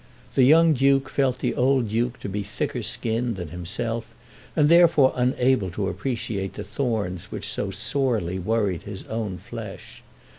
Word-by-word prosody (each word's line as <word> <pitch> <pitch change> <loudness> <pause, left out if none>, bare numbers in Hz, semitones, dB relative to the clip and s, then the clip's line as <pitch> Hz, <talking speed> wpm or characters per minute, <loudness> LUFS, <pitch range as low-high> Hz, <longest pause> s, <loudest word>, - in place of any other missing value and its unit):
The - - +3
young 160 +5 +6
Duke 135 0 +3
felt 130 -3 +1
the - - -1
old 130 -3 +2
Duke 120 +3 -1
to - - -5
be 100 +1 -3
thicker 100 +1 -3
skinned 115 +1 -1
than 90 -4 -6
himself 110 +7 -3 0.5
and 150 -2 +4
therefore 165 -5 +6
unable 125 -4 +2
to 95 +2 -2
appreciate 100 -1 -3
the 105 - -6
thorns 105 -5 -2
which - - -4
so - - -2
sorely 110 -10 -1
worried 100 -2 0
his 100 -2 -7
own 110 -5 -3
flesh. - - -9
115 Hz, 155 wpm, -24 LUFS, 100-130 Hz, 0.5 s, young